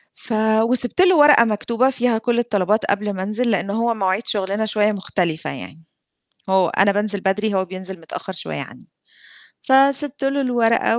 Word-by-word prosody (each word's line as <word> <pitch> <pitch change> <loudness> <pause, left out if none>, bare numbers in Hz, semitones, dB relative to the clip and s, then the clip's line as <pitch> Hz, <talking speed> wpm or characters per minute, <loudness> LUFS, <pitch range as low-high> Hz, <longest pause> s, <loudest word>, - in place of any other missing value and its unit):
ف 245 - -7 0.3
وسِبت 245 +7 0
له 370 -2 +5
ورقة 295 -5 +7
مكتوبة 230 +4 0
فيها 245 -3 0
كلّ 240 +1 -1
الطلبات 215 -2 0
قبل 205 0 -1
ما 185 -1 -4
انزل، 225 +5 -1
لإن 200 -1 -1
هو 230 +3 0
مواعيد 195 0 -1
شغلنا 200 +1 -1
شوية 210 0 +1
مختلفة 175 -5 -3
يعني، 150 +4 -10 0.7
هو 190 -2 +3
أنا 195 +4 +2
بانزل 205 0 -1
بدري 200 +2 -1
هو 190 -1 +1
بينزل 185 0 -8
متأخّر 165 +3 -7
شوية 185 - -6
عني، - - -13 0.7
فسِبت 275 +1 +2
له 275 +1 0
الورقة 230 -3 +1
215 Hz, 165 wpm, -20 LUFS, 190-240 Hz, 0.7 s, ورقة